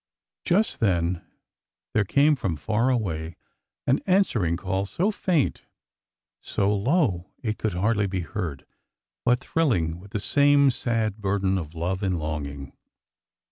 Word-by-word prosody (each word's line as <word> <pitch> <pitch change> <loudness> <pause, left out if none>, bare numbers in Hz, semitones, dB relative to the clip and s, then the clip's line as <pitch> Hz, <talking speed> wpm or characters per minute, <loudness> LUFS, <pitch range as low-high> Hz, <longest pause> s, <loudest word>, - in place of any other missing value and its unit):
Just 205 +6 +2
then 85 -4 +1 0.7
there 105 - +3
came 140 +9 +4
from 95 - -2
far 110 - 0
away 85 -10 -1 0.5
an 135 - +3
answering 120 - +2
call 95 +2 -2
—so 180 - 0
faint, 175 -8 0 0.8
so 100 +1 0
low 105 - +1
it 110 -3 -2
could 110 -4 -1
hardly 105 +2 +1
be 95 -1 -2
heard, 85 -6 -5 0.6
but 125 +1 +3
thrilling 90 - 0
with 100 +3 -13
the 105 - -3
same 140 +3 +4
sad 115 -4 -1
burden 95 -2 0
of 80 -1 -8
love 90 +4 -2
and 95 -3 0
longing. 70 -3 -5
100 Hz, 135 wpm, -25 LUFS, 85-125 Hz, 0.8 s, came